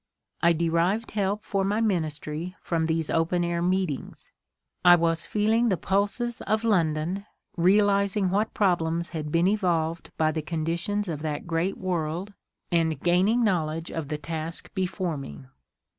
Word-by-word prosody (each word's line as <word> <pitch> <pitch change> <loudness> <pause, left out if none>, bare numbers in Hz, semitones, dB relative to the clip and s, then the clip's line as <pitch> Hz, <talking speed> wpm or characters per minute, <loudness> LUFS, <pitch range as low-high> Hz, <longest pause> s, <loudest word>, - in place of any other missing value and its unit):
I 170 0 +5
de 170 +1 0
rived 180 +7 +1
help 205 0 -1
for 195 -1 -1
my 205 +3 0
ministry 165 -4 -1
from 165 -2 -1
these 160 -1 -1
open 165 +2 +1
air 170 0 -1
meetings. 180 -5 -2 0.5
I 175 -1 +9
was 165 -1 +1
feeling 220 +3 +2
the 190 - +1
pulses 205 +7 0
of 215 +1 +1
London, 180 -1 0 0.3
realizing 200 +1 +3
what 210 +3 0
problems 170 -4 +1
had 155 -3 -5
been 170 +3 +3
evolved 170 -5 0
by 155 -1 +2
the 155 - -2
conditions 170 +6 -2
of 155 -4 -4
that 150 -2 -3
great 170 +3 -1
world, 180 +2 -2 0.4
and 160 -4 +1
gain 180 +4 +3
ing 235 +2 +3
knowledge 165 -5 0
of 160 -3 -4
the 150 - -3
task 160 +2 -5
before 185 -3 -2
me. 70 - -9
175 Hz, 155 wpm, -26 LUFS, 160-200 Hz, 0.5 s, I